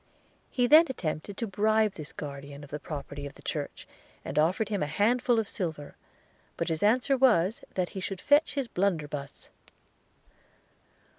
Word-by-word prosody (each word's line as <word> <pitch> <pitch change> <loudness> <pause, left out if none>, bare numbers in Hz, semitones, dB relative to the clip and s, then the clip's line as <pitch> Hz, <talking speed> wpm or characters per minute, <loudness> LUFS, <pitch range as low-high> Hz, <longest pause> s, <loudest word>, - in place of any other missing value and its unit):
He 245 - +1
then 310 +6 +8
attempted 185 -4 -4
to 230 - -2
bribe 215 +2 +2
this 155 -3 -9
guardian 140 0 -8
of 145 - -13
the 150 - -4
property 145 -1 -6
of 140 - -12
the - - -17
church, - - -4 0.4
and 150 - -1
offered 185 +7 +2
him 205 -2 -1
a 150 - 0
handful 235 +9 +2
of 220 -2 0
silver: 160 -7 -5 0.6
but - - -1
his 160 -1 -1
answer 250 +6 +3
was, 220 -7 +3
that 180 -2 0
he 195 - -6
should 190 0 -4
fetch 290 - +3
his 275 -3 -1
blunderbuss. 155 -9 -2
190 Hz, 160 wpm, -29 LUFS, 150-225 Hz, 0.6 s, then